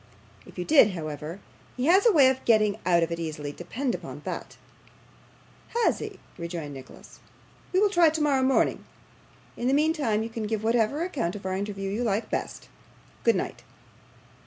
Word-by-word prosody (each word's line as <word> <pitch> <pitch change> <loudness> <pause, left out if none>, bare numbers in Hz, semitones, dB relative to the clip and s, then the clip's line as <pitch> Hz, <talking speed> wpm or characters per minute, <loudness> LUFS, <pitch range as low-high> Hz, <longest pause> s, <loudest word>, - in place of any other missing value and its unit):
If - - -15
you 180 - -3
did, 275 -10 +6
however, 155 +2 -6 0.4
he 250 - -1
has 380 +8 +5
a - - +7
way 290 -8 +6
of 260 0 -2
getting 215 -2 +3
out 170 -2 +4
of 165 - -2
it 170 - -3
easily, 150 -3 -4
depend 235 - -3
upon - - -7
that.' - - -6 1.3
'Has - - +2
he?' - - -7 0.2
rejoined 170 -4 -5
Nicholas. 130 -1 -13 0.5
'We 375 - +3
will 415 - +4
try, 345 -4 +5
tomorrow 300 -4 +1
morning. 260 0 +2 0.7
In 240 - -2
the 270 - +3
meantime, 290 -8 +1
you 225 - -5
can 225 -2 -4
give 220 0 -2
whatever 230 +7 +1
account 255 - -2
of 200 - -9
our 190 - -1
interview 195 0 -3
you 220 +5 -1
like 215 -1 -1
best. - - -4 0.6
Good - - +4
night. - - -3
220 Hz, 175 wpm, -26 LUFS, 175-280 Hz, 1.3 s, a